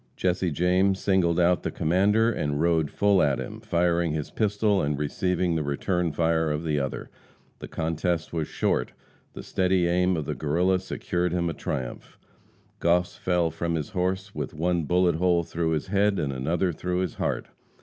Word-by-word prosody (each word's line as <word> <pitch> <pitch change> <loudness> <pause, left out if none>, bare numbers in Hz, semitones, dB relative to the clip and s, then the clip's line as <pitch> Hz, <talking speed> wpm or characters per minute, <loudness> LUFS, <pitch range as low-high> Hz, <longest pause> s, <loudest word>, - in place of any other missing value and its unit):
Jesse 90 0 0
James 90 +4 +2
singled 90 -3 +2
out 90 0 +3
the - - -2
commander 105 +7 +2
and 75 -8 -2
rode 80 -2 +2
full 100 +2 +3
at 70 -2 +2
him, - - -6
firing 85 -1 +1
his 75 -2 -4
pistol 105 -1 +1
and 75 0 -1
receiving 90 +4 0
the 80 - 0
return 85 +4 -1
fire 80 +1 +1
of 75 +2 -2
the 75 -3 0
other. 70 -1 -4 0.5
The - - -7
contest 80 +1 -2
was 80 -3 -1
short; - - -1 0.4
the - - -8
steady 95 -1 +1
aim 90 +1 +2
of 80 - -3
the - - -2
Guerrilla 90 +5 +1
secured 90 -1 -2
him 85 -1 0
a - - -5
triumph. 65 -4 -5 0.6
Goss 90 +1 +2
fell 90 -2 0
from 85 +1 -2
his 75 -3 -3
horse 95 +1 -2
with 90 - -5
one 85 0 0
bullet 90 0 +2
hole 85 -1 +2
through 85 0 -2
his 80 +1 -1
head 100 +1 +2
and 70 -2 -1
another 85 +7 0
through 90 +3 -2
his 90 -3 -2
heart. - - -2
85 Hz, 180 wpm, -26 LUFS, 80-90 Hz, 0.6 s, out